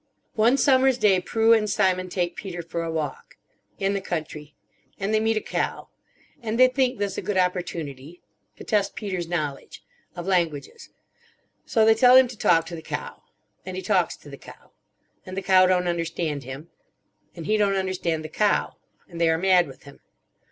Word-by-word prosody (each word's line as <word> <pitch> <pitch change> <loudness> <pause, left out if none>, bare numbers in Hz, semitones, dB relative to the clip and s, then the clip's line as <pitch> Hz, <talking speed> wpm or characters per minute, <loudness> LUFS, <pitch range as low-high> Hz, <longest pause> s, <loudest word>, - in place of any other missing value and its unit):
"One 230 +5 +3
summer's 265 -2 +4
day 200 -6 +4
Prue 225 +5 +3
and 215 -2 +2
Simon 185 -3 +1
take 175 -1 -2
Peter 175 -4 -6
for 170 +1 -4
a 165 - -3
walk. 155 -3 -5 0.4
In 195 0 0
the 200 - -2
country. 155 -5 -6 0.4
And 200 +2 -2
they 215 - +3
meet 220 0 +1
a - - 0
cow. - - -3 0.5
And 225 0 -3
they 255 0 +7
think 255 -1 0
this 200 -1 -2
a - - -4
good 205 - -2
opportunity. 170 -4 -3 0.4
To - - -11
test 200 -2 0
Peter's 185 -5 -4
knowledge. 155 -5 -4 0.3
Of 175 - -6
languages. 175 - -2 0.8
So 220 -2 +3
they 225 - +6
tell 245 +3 +6
him 260 -1 +7
to 245 - -9
talk 165 -5 +3
to 170 - -7
the 160 - -8
cow. 475 - -6 0.4
And - - -7
he 380 - -5
talks - - +1
to - - -15
the - - -9
cow. - - -15 0.5
And 185 0 -9
the 195 - -3
cow 185 -1 +5
don't 180 -1 +1
understand 165 -4 -2
him. 135 +5 -9 0.6
And 165 -2 -8
he 215 - +1
don't 205 -2 +2
understand 180 -4 -2
the - - -6
cow. 210 +5 0 0.3
And 170 -1 -8
they 165 - +4
are 160 - +2
mad 180 -1 +3
with 135 - -14
him. 140 0 -14
185 Hz, 190 wpm, -24 LUFS, 165-215 Hz, 0.8 s, they